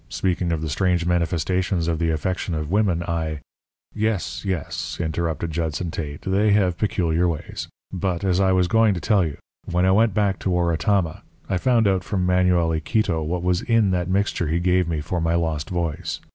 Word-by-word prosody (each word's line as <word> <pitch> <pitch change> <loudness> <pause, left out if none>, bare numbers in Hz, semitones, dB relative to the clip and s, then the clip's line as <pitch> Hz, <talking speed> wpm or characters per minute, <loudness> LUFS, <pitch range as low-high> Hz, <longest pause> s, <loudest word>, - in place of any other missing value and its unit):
Speaking 90 -2 -1
of 80 -2 -1
the 80 - -2
strange 90 +3 +1
manifestations 90 +1 0
of 80 -2 0
the 85 -1 +1
affection 85 +2 -2
of 75 +1 -3
women, 95 -4 +2
I 80 -3 -3 0.3
" - - -47
"Yes, 85 -5 -3
yes," 95 -6 -3
interrupted 80 0 -2
Judson 80 +1 -2
Tate; 75 -3 -5
"they 100 +2 +2
have 95 -4 +2
peculiar 90 -4 +1
ways. 85 -1 -4 0.3
But, 95 -1 -2
as 95 -1 +2
I 95 -1 +3
was 90 -1 +3
going 110 +1 +3
to - - -3
tell 100 0 +2
you: 75 -4 -4 0.3
when 90 +1 +1
I 95 - +4
went 110 0 +3
back 100 -3 +1
to - - -2
Oratama 85 0 +1 0.3
I 95 - 0
found 115 +1 +3
out 95 -2 +1
from 95 -2 -1
Manuel 90 -2 +3
Iquito 80 +1 0
what 85 +3 -2
was 90 0 +1
in 115 -4 +2
that 90 -1 -1
mixture 95 -3 0
he 80 +3 0
gave 90 0 +2
me 80 -3 -2
for 85 +3 -2
my 80 +1 +1
lost 80 -3 -1
voice. 85 -2 -3
90 Hz, 195 wpm, -23 LUFS, 80-95 Hz, 0.3 s, I